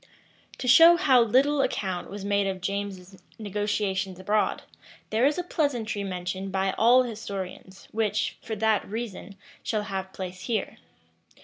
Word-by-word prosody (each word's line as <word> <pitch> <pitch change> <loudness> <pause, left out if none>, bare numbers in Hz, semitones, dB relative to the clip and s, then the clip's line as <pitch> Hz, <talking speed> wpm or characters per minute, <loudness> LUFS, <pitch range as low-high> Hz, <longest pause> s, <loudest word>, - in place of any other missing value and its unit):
To 255 - -5
show 330 +7 +8
how 265 -8 +5
little 270 +5 +3
account 190 -8 -2
was 200 0 -7
made 200 -1 +1
of 190 -1 -3
James's 190 -1 -5 0.2
negotiations 205 -2 -2
abroad, 205 +3 0 0.5
there 225 +5 +3
is 295 - 0
a 355 - -1
pleasantry 240 - -1
mentioned 185 0 -4
by 190 0 0
all 245 +3 +5
historians, 200 -5 -7
which, 220 -2 -1
for 220 - -5
that 220 0 +2
reason, 215 -2 -6 0.3
shall 215 -2 -2
have 190 -2 -5
place 185 -1 -7
here. 225 -4 -2
205 Hz, 140 wpm, -26 LUFS, 190-230 Hz, 0.5 s, show